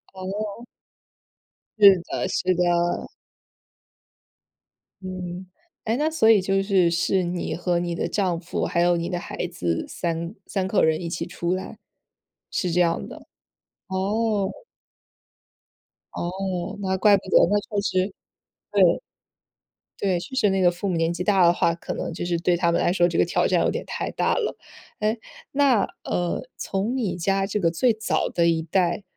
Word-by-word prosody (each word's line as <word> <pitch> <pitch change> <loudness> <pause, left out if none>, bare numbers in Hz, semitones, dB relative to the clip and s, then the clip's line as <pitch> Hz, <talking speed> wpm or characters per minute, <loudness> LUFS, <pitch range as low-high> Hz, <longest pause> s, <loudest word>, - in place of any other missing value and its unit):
哦。 205 +4 -5 1.1
是 195 -4 +8
的 - - -3
是 185 0 +1
的。 180 - +2 2.4
嗯。 185 -1 -6 0.4
诶， 225 +2 0
那 305 +3 +1
所 315 -9 +2
以 210 - +5
就 195 +1 +1
是 190 -4 +3
是 180 +2 +1
你 175 -2 -3
和 175 +1 0
你 175 -1 -2
的 - - -2
丈 185 -5 0
夫， 170 0 -3
还 170 - 0
有 175 0 +3
你 170 0 -2
的 175 - -2
孩 180 - -5
子 85 - -2
3 170 +1 -3
3 190 -2 -1
口 195 - +2
人 160 0 +3
一 170 - -5
起 170 - -3
出 175 +1 -2
来？ 185 - -5 0.7
是 180 - -1
这 180 +1 +3
样 170 -1 +1
的， - - -12 0.6
哦。 200 +1 0 1.6
哦， 180 0 -3
那 190 -1 0
怪 205 +1 +5
不 195 - -10
得， - - +5
那 205 +1 +3
确 205 -1 -3
实 185 0 0 0.6
对。 - - +4 1.0
对， 185 -3 +1
确 185 - -10
实 215 -6 +3
那 190 0 +1
个 175 - +6
父 180 +3 -4
母 185 - 0
年 165 +1 +1
纪 175 +1 -4
大 195 -2 +4
的 170 - +6
话， 170 -1 +1
可 170 - -6
能 - - -4
就 170 - -4
是 175 -1 0
对 175 +1 +2
他 170 -1 +2
们 170 - +1
来 - - +2
说 175 -2 +3
这 165 - -2
个 - - +5
挑 170 - +1
战 - - +2
有 - - +2
点 - - -4
太 - - -4
大 - - +1
了。 465 - -2 0.4
诶， 215 +2 0 0.3
那， 270 -8 +3 0.2
呃， 175 -1 -1 0.2
从 205 +6 -2
你 220 -9 -1
家 195 +3 +1
这 210 - -1
个 170 -5 +2
最 230 +9 +2
早 220 +1 -1
的 170 -1 +1
一 165 -1 +2
代， 175 +3 0
185 Hz, 180 characters per minute, -24 LUFS, 175-200 Hz, 2.4 s, 是